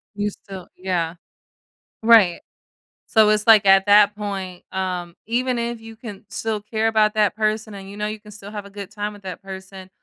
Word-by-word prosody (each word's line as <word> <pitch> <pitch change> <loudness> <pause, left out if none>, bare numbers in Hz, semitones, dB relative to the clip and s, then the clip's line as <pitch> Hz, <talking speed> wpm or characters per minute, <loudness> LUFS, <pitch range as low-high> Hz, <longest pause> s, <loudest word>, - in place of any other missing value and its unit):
You 205 0 -1
still 190 -3 -11
Yeah. 175 -3 -2 0.9
Right. 220 -6 +6 0.7
So 220 -2 +5
it's 215 0 +2
like 215 -3 +7
at 195 +1 +6
that 205 0 +6
point, 195 -3 -5
um, 180 -2 -3
even 245 +2 0
if 235 -1 -3
you 225 0 -11
can 210 -4 -10
still 220 -2 -3
care 220 +1 -1
about 215 -1 +3
that 210 -1 +2
person 215 0 -1
and 195 -1 -9
you 200 - -10
know 210 - -2
you 215 0 -5
can 210 - -14
still 205 0 -10
have 205 -1 -6
a - - -11
good 200 -1 -8
time 210 0 -4
with 205 -1 -15
that 185 -1 -7
person, 190 0 -9
205 Hz, 200 wpm, -22 LUFS, 195-215 Hz, 0.9 s, like